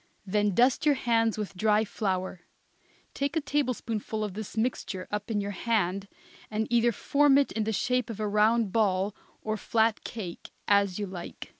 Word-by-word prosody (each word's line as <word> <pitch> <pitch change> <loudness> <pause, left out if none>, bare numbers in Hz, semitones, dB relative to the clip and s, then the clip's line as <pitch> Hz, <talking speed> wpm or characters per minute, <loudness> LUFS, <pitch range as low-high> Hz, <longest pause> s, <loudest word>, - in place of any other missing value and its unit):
Then 205 0 +1
dust 245 +1 +4
your 295 -2 +4
hands, 230 -3 +1
with 205 -2 -4
dry 215 +3 +3
flour; 185 -4 -2 0.7
take 280 +3 -2
a - - +3
tablespoonful 250 -7 -2
of 210 -3 -3
this 215 +2 -7
mixture 220 -5 -2
up 210 +1 -3
in 215 -2 0
your 200 0 -3
hand 200 -2 0 0.4
and 215 +1 -1
either 240 0 +4
form 280 +5 +3
it 280 - +2
in 220 -1 -1
the 220 - 0
shape 250 +3 0
of 220 -2 -6
a 215 - -1
round 210 +1 +3
ball 200 -2 +1 0.3
or 215 0 -1
flat 220 +1 +1
cake, 185 -7 -7 0.2
as 200 -2 +3
you 210 - -2
like. 185 -3 -8
215 Hz, 175 wpm, -28 LUFS, 200-235 Hz, 0.7 s, dust